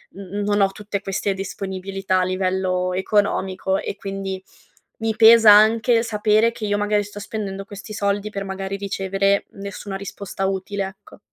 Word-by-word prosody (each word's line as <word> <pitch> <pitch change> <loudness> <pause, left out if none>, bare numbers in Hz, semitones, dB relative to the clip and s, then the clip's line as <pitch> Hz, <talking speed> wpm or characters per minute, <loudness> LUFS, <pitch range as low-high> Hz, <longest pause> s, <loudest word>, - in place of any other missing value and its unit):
n 195 - -8 0.2
n - - -1
non 205 0 +1
ho 195 - +5
tutte 205 0 -5
queste 195 0 -1
disponibilità 195 0 -3
a - - +2
livello 185 0 0
economico 190 -1 0
e - - -4
quindi 195 -1 -5 0.5
mi 225 0 -1
pesa 225 -1 +8
anche 225 +3 +5
sapere 215 0 +2
che 220 - -5
io, 205 0 +1
magari, 205 0 +1
sto 205 0 -9
spendendo 195 -2 -5
questi 205 +2 -10
soldi 200 0 -1
per, 200 -1 -5
magari, 195 0 -4
ricevere 195 0 0
nessuna 200 0 -6
risposta 195 0 -5
utile, 195 +1 -2
ecco. 195 - -15
200 Hz, 160 wpm, -22 LUFS, 195-210 Hz, 0.5 s, pesa